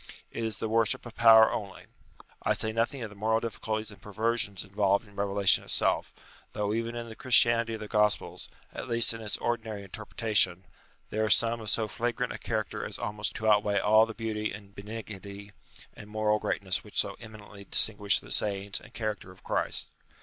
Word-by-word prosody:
It 115 - -4
is 110 -2 -2
the 110 - -3
worship 115 +1 +1
of 120 - -9
power 110 -1 +7
only. 100 -3 -5 0.6
I - - +1
say 110 - -1
nothing 115 +3 -1
of 110 - -6
the - - -13
moral 110 +2 +1
difficulties 110 -1 -4
and 100 - -15
perver 110 +3 -1
sions 105 -5 -1
involved 100 +1 0
in 100 - -19
revelation 100 -1 +3
itself; - - +1 0.4
though 105 -1 -1
even 115 +1 -2
in 120 0 -5
the 110 - -9
Christianity 115 -1 +3
of 110 - -9
the 105 - -6
Gospels, 105 -4 +1 0.2
at - - -6
least 115 0 +5
in 115 - -8
its 105 -2 0
ordinary 110 -3 -3
interpretation, 105 -2 -1 0.5
there 110 +1 0
are 110 - 0
some 115 +2 +3
of 110 - -3
so 110 -1 +1
flagrant 120 +3 -2
a - - -8
character 110 0 -3
as - - -4
almost 105 0 -4
to 110 +2 -3
outweigh 105 -1 +3
all 110 +3 +5
the 115 - -8
beauty 110 -2 -3
and 100 -1 -11
benignity 100 -1 -9 0.4
and 105 - -12
moral 105 0 +1
greatness 95 -3 -1
which 105 - -11
so 100 - -1
eminently 105 -3 -12
distinguish 105 -1 +5
the - - -8
sayings 100 -1 -1
and 120 - -17
character 110 -4 -4
of 95 - -19
Christ. - - -1
110 Hz, 195 wpm, -28 LUFS, 100-115 Hz, 0.6 s, power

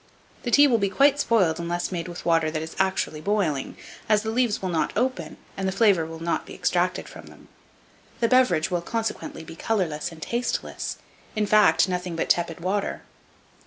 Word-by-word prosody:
The 245 - -3
tea 285 +5 +7
will 240 -5 +3
be 200 -1 +1
quite 280 +6 +4
spoiled 190 - +2
unless 175 +2 -2
made 175 -1 -3
with 175 0 -8
water 165 -2 +3
that 155 0 -3
is 160 - -8
actually 190 -5 0
'boiling', 180 -8 -1 0.3
as 210 -1 +3
the 220 - -2
leaves 240 -2 +1
will 190 - -3
not 165 -2 0
open, 225 -10 -1 0.2
and 195 0 -2
the - - 0
flavour 195 -5 +3
not 170 +1 -1
be - - -9
extracted - - 0
from - - -12
them; - - -16 0.7
the 230 - +3
beverage 225 -10 +3
will 175 -1 0
consequently 225 -4 -4
be 165 0 -10
colourless 170 -6 -1
and 165 - -12
tasteless, 235 +9 -3 0.4
in 215 -1 +1
fact, 210 -1 +5
nothing 180 -1 -3
but 165 - -2
tepid 170 -1 0
water. 195 +3 -2
185 Hz, 185 wpm, -25 LUFS, 165-220 Hz, 0.7 s, tea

